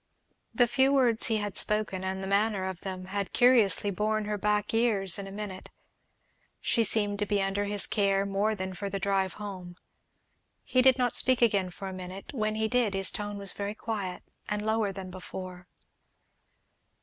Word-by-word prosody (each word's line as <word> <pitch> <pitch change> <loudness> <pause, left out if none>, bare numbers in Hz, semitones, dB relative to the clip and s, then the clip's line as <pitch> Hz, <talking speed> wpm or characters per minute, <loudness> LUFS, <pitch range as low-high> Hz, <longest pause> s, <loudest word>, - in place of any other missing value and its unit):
The 245 - +4
few 265 +3 +3
words 245 -5 +3
he 225 - +1
had 205 -1 -4
spoken, 210 -3 +1
and 190 0 -3
the - - -4
manner 200 -1 +1
of 185 -2 -6
them, 185 -2 -6
had 195 0 -4
curiously 220 -6 +4
borne 215 +2 -1
her 210 0 -2
back 210 +1 0
years 210 -5 +2
in 195 - -6
a - - -8
minute; 200 -2 -7 0.9
she 230 - +1
seemed 205 -1 -1
to 210 - 0
be 205 0 +1
under 195 +1 0
his 205 0 -1
care 195 -1 +1
more 200 +2 0
than 190 -1 -4
for 200 +2 -5
the 195 - -3
drive 195 -1 0
home. 185 -4 -8 0.9
He 255 - +2
did 260 0 +5
not 250 -2 +1
speak 255 -1 +4
again 200 -5 +2
for 195 +2 -8
a 190 - -5
minute; 185 +4 -8
when 215 -4 -1
he 220 0 0
did 230 -4 +1
his 195 0 +1
tone 205 0 -5
was 200 -2 -4
very 205 +1 -4
quiet 205 -5 -4 0.3
and 210 0 -2
lower 220 -2 +1
than 190 -1 -8
before. 185 -1 -8
205 Hz, 185 wpm, -29 LUFS, 190-215 Hz, 0.9 s, did